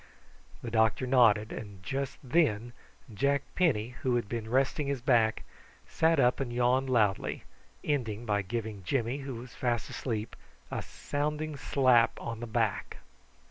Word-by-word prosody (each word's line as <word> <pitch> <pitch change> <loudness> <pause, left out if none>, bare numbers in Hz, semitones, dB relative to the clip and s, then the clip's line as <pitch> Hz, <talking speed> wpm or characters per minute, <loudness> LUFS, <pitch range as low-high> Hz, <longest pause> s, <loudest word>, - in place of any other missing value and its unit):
The 115 - -5
doctor 110 +2 +2
nodded; 115 -4 +4
and 100 -4 -8
just 135 +2 -3
then 120 -5 +1 0.4
Jack 140 +5 +1
Penny, 125 -12 +2
who 125 -2 +1
had 120 -4 -1
been 110 0 -4
resting 135 +3 +1
his 140 -2 -1
back, 115 -4 +2 0.4
sat 165 -1 +2
up 125 -1 +3
and 135 -3 -2
yawned 125 +2 +2
loudly, 110 -6 +1 0.4
ending 120 -6 -1
by 105 -2 +1
giving 110 0 -4
Jimmy, 120 +6 -1
who 135 -2 -6
was 120 +1 -9
fast 120 -2 -1
asleep, 115 -3 -4 0.4
a - - -2
sounding 150 +1 -3
slap 130 -4 +3
on 115 -1 -5
the 120 - -5
back. 110 -3 -1
120 Hz, 145 wpm, -30 LUFS, 110-135 Hz, 0.4 s, nodded